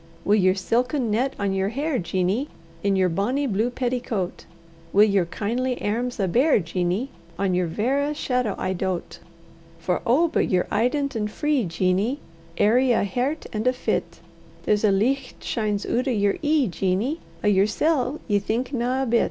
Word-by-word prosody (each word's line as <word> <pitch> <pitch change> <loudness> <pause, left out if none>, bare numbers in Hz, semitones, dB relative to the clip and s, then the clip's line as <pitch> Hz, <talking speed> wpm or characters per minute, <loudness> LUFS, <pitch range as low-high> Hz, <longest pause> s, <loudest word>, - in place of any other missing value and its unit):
] 165 - -27
Wi' 205 - +3
yer 185 -3 +4
silken 240 +5 0
net 260 +5 0
on 200 -1 -1
yer 195 +1 0
hair, 280 +4 -1
Jeanie, 185 - -1 0.3
In 200 -1 +1
yer 190 -1 +3
bonny 210 +12 0
blue 225 0 0
petticoat, 245 -6 -3 0.5
Wi' 205 - +7
yer 200 -4 +3
kindly 245 +8 -2
airms 240 +4 -2
a' 195 - +1
bare, 255 - +4
Jeanie, 180 +7 -1 0.3
On 195 -2 0
yer 180 -1 +1
verra 270 - 0
shadow 250 -7 -1
I 185 - -1
doat. 185 -1 -3 0.6
For 175 +2 -1
oh! 285 +9 +3
but - - 0
ye're 180 -1 +2
eident 280 +3 0
and 210 -1 -1
free, 295 0 0
Jeanie, 185 - 0 0.4
Airy 245 +4 +4
o' - - +2
hert 255 - -2
and 215 +3 -1
o' 255 - +4
fit; 250 - -2 0.4
There's 210 0 +1
a 210 - +4
licht 255 +7 0
shines 210 -3 -1
oot 250 +3 0
o' - - +2
yer 205 -4 +1
ee, 295 -3 +2
Jeanie; 195 - -1 0.2
O' - - +1
yersel' 250 +9 +2
ye 205 -3 +2
thinkna 250 +4 -1
a - - -1
bit. 235 -1 +3
225 Hz, 175 wpm, -24 LUFS, 195-255 Hz, 0.6 s, Wi